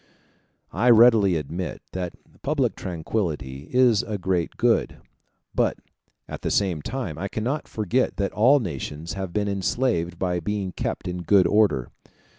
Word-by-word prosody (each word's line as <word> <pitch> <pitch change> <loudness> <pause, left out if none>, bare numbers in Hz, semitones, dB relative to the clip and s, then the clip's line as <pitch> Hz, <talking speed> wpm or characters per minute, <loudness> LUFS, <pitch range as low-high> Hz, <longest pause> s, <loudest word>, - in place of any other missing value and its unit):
I 125 - +2
readily 110 -5 +6
admit 80 +3 -4
that 90 -2 -4 0.3
public 140 -4 0
tranquillity 80 -6 -3
is 125 -4 +4
a 110 -4 -4
great 90 -2 -1
good; - - +1 0.6
but - - +1 0.5
at - - -7
the - - -2
same 90 -6 +1
time 100 - -4
I 100 - -2
cannot 125 +9 -3
forget 110 +4 -1
that 100 -1 -1
all 130 +7 +5
nations 80 - -5
have 95 -2 -4
been 105 +2 -1
enslaved 95 -3 0
by 90 -1 -1
being 100 +2 -3
kept 90 - -4
in 90 0 -4
good 95 +1 +4
order. 100 - +2
95 Hz, 145 wpm, -24 LUFS, 85-110 Hz, 0.6 s, readily